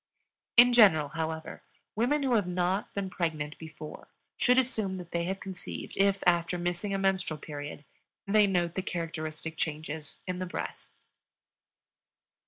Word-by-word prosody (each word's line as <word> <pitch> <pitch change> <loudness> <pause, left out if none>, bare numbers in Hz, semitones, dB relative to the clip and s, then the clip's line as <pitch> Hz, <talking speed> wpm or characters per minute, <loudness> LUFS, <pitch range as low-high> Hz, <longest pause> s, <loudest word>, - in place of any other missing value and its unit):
In 245 +1 +9
general, 160 -11 +6
however, 160 0 -4 0.3
women 265 +7 +2
who 260 -2 +2
have 210 -5 +3
not 180 +2 0
been 195 -2 -2
pregnant 155 -4 -2
before 155 -1 -9 0.3
should 250 0 +4
assume 220 -7 +1
that 175 -2 -9
they 170 0 0
have 190 +2 -2
conceived 190 -2 -7
if, 195 0 +2
after 175 0 +3
missing 175 +3 -2
a 195 - +1
menstrual 190 -4 +1
period, 145 0 -7 0.4
they 210 +1 +5
note 175 -3 +1
the 190 - -1
characteristic 160 -2 -4
changes 155 -1 -4
in 185 -1 -3
the 185 - -3
breasts. 70 - -6
175 Hz, 145 wpm, -30 LUFS, 160-195 Hz, 0.4 s, In